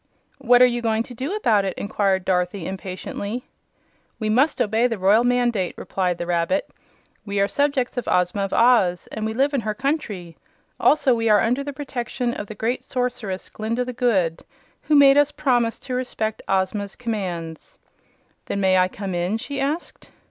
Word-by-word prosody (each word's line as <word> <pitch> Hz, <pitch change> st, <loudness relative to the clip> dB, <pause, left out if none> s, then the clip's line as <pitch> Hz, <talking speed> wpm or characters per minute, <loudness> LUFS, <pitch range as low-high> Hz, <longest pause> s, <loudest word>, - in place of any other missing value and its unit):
"What 245 Hz, -1 st, +5 dB
are -, -, +9 dB
you 240 Hz, -1 st, 0 dB
going 225 Hz, -1 st, +1 dB
to 245 Hz, -, -11 dB
do 270 Hz, -, -3 dB
about 220 Hz, -, +2 dB
it?" 190 Hz, -2 st, -3 dB
inquired 195 Hz, -2 st, 0 dB
Dorothy, 180 Hz, -1 st, 0 dB
impatiently. 195 Hz, +5 st, -5 dB, 0.7 s
"We 215 Hz, -2 st, -2 dB
must 265 Hz, +8 st, +2 dB
obey 225 Hz, +3 st, +2 dB
the 230 Hz, -3 st, -3 dB
royal 200 Hz, +5 st, +4 dB
mandate," 245 Hz, -6 st, +1 dB
replied 180 Hz, -2 st, -2 dB
the 175 Hz, -, -4 dB
rabbit. 175 Hz, +11 st, 0 dB, 0.6 s
"We 200 Hz, -1 st, -3 dB
are 200 Hz, -, +3 dB
subjects 280 Hz, -1 st, 0 dB
of 245 Hz, -, -3 dB
Ozma 180 Hz, +3 st, +1 dB
of 195 Hz, -1 st, -2 dB
Oz, 225 Hz, -8 st, +3 dB
and 220 Hz, 0 st, -3 dB
we 220 Hz, -, -4 dB
live 275 Hz, +4 st, +2 dB
in 275 Hz, -, +1 dB
her 215 Hz, -1 st, -3 dB
country. 215 Hz, -, -3 dB, 0.4 s
Also 280 Hz, -4 st, +4 dB
we 230 Hz, -1 st, 0 dB
are 210 Hz, -1 st, +6 dB
under 250 Hz, +5 st, +1 dB
the 285 Hz, -, -5 dB
protection 255 Hz, -3 st, -3 dB
of 205 Hz, -, -6 dB
the 215 Hz, -, -8 dB
great 230 Hz, +5 st, -2 dB
Sorceress 245 Hz, -7 st, -3 dB
Glinda 230 Hz, +3 st, -2 dB
the 250 Hz, -, -5 dB
Good, 190 Hz, -10 st, +1 dB, 0.4 s
who 305 Hz, -, +1 dB
made 280 Hz, 0 st, +7 dB
us 290 Hz, 0 st, +3 dB
promise 250 Hz, -6 st, +1 dB
to 255 Hz, -, -6 dB
respect 225 Hz, -4 st, -2 dB
Ozma's 195 Hz, +1 st, -1 dB
commands." 180 Hz, -9 st, -5 dB, 0.7 s
"Then 200 Hz, -, -2 dB
may 190 Hz, -1 st, +4 dB
I 185 Hz, -, +4 dB
come 195 Hz, 0 st, -6 dB
in?" 175 Hz, +5 st, -1 dB
she 275 Hz, +4 st, -5 dB
asked. 295 Hz, +5 st, -4 dB
225 Hz, 180 wpm, -22 LUFS, 190-250 Hz, 0.7 s, are